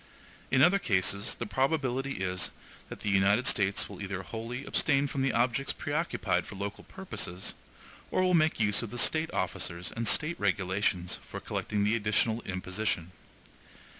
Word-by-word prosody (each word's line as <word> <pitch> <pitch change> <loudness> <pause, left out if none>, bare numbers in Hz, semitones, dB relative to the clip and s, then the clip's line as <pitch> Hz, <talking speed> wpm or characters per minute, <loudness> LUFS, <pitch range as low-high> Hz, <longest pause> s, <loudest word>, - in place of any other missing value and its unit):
In 130 0 +5
other 190 +5 +5
cases, 100 - +1
the - - -4
probability 135 -4 0
is 90 -1 -1 0.4
that - - -8
the 105 - -1
United 100 +5 +4
States 100 -1 +2
will - - -9
either 95 -1 -4
wholly 115 +7 -5
abstain 140 -2 +2
from 140 -1 -2
the 135 - +2
objects 125 +3 +1
preoccupied - - -1
for - - -8
local 100 +1 -5
purposes, 135 - -5 0.6
or 185 - +1
will 185 0 +3
make 155 -5 +3
use 105 -2 +3
of 115 - -5
the 120 - -6
State 160 +6 +3
officers 85 +1 -2
and 115 0 -1
State 160 +3 +2
regulations 95 -2 0
for - - -5
collecting 105 -1 -2
the 105 +2 +3
additional 110 +1 +1
imposition. 95 -1 -2
110 Hz, 160 wpm, -30 LUFS, 95-135 Hz, 0.6 s, In